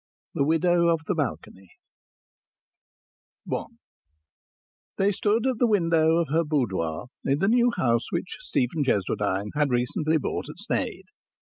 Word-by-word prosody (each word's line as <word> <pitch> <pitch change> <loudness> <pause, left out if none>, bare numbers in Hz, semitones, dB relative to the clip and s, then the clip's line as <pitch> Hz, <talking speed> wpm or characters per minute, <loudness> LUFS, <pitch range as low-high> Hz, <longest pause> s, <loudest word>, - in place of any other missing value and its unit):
THE - - +1
WIDOW 170 +3 +3
OF 165 -1 +2
THE 195 - 0
BALCONY 120 - -4 1.8
I - - -1 1.3
They 195 +1 +3
stood 210 +4 +1
at 260 -4 0
the 245 - +4
window 165 -6 +3
of 170 -4 0
her 165 +3 +2
boudoir 105 - -2
in 140 +1 +1
the 195 +6 +1
new 240 +2 +4
house 115 -2 +1
which - - -3
Stephen 145 - -1
Cheswardine 100 -3 0
had 150 -1 +1
recently 125 +6 +1
bought 150 - -3
at - - -9
Sneyd. - - -3
155 Hz, 135 wpm, -25 LUFS, 125-175 Hz, 1.8 s, the